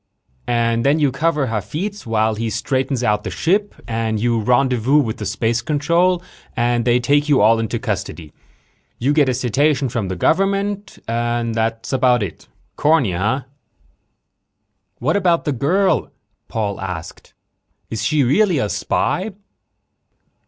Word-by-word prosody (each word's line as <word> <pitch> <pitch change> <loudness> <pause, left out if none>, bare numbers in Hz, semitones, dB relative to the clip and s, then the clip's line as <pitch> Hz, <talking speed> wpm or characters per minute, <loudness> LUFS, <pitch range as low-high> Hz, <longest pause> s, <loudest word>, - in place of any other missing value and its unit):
"And 115 -1 +1
then 140 +3 +3
you 145 -4 +2
cover 150 -1 0
Hafitz 130 - -4
while 110 0 +1
he 115 +1 -3
straightens 130 +4 -1
out 105 -2 +1
the - - -4
ship 205 +5 0
and 110 -1 -1
you 115 +1 +1
rendezvous 125 +3 +2
with 115 -7 +1
the 105 - -4
space 115 +4 0
control 170 +5 +1 0.3
and 120 0 +1
they 120 0 +3
take 145 +4 +2
you 145 - +4
all 115 +2 +5
into 115 +1 -2
custody. 95 -8 -4 0.6
You 135 +5 +1
get 145 -3 +3
a - - +1
citation 135 +3 +1
from 110 -4 -2
the 95 - -3
government. 195 - 0
That's 115 0 -1
about 125 -3 +3
it. 85 -6 -7 0.3
Corny, 150 - +3
huh?" 105 +10 0
"But - - -31 1.5
what 150 +7 0
about 175 -4 +2
the 150 - +1
girl?" 175 +10 +1 0.4
Paul 105 -3 -3
asked. 90 -3 -7 0.6
"Is 110 -1 -3
she 145 +6 +2
really 175 - +3
a 105 -6 0
spy?" 195 - -1
125 Hz, 145 wpm, -19 LUFS, 110-150 Hz, 1.5 s, all